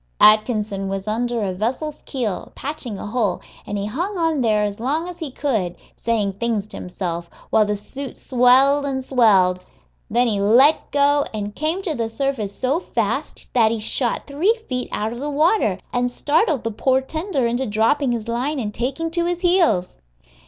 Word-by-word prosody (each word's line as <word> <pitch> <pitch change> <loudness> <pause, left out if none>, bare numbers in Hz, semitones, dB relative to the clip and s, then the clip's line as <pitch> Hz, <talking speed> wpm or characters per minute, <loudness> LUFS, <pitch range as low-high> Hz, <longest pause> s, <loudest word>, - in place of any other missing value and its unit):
Atkinson 215 -2 +4
was 195 +1 -4
under 235 +1 -1
a 190 -2 -1
vessel's 260 +10 -3
keel, 235 -9 -3
patching 270 -7 -5
a - - -6
hole, 210 -3 0 0.3
and 205 - -3
he 200 - -2
hung 350 - -3
on 325 -4 +1
there 215 -3 +2
as 205 0 -3
long 295 +8 -1
as 355 -1 -8
he 320 -4 -4
could, 225 -10 -1 0.2
saying 215 -4 -1
things 220 0 -1
to 215 - -10
himself, 175 -2 -5 0.2
while 215 -1 +4
the 210 - 0
suit 265 +6 -7
swelled 265 +3 +4
and 265 -2 -2
swelled. 190 -8 +3 0.5
Then 240 +3 +3
he 210 -4 +1
let 250 +9 +5
go, 285 0 +3
and 205 -1 -4
came 320 - -1
to 335 - -1
the 230 -5 -2
surface 225 -3 -2
so 260 +9 0
fast - - -3
that 230 -3 +4
he 230 - -1
shot 235 +3 0
three 360 +12 +1
feet 250 -1 -3
out 215 +2 -2
of 240 - -7
the 290 +2 -3
water, 300 - +2 0.2
and 245 0 +1
startled 300 - +1
the 230 - -2
poor 260 +4 +2
tender 315 -1 -2
into 240 +3 0
dropping 230 +6 +2
his 230 -2 -3
line 250 +6 -1
and 210 -4 -3
taking 275 +8 -2
to 340 0 0
his 350 0 -2
heels. 345 - +2
245 Hz, 185 wpm, -21 LUFS, 210-290 Hz, 0.5 s, let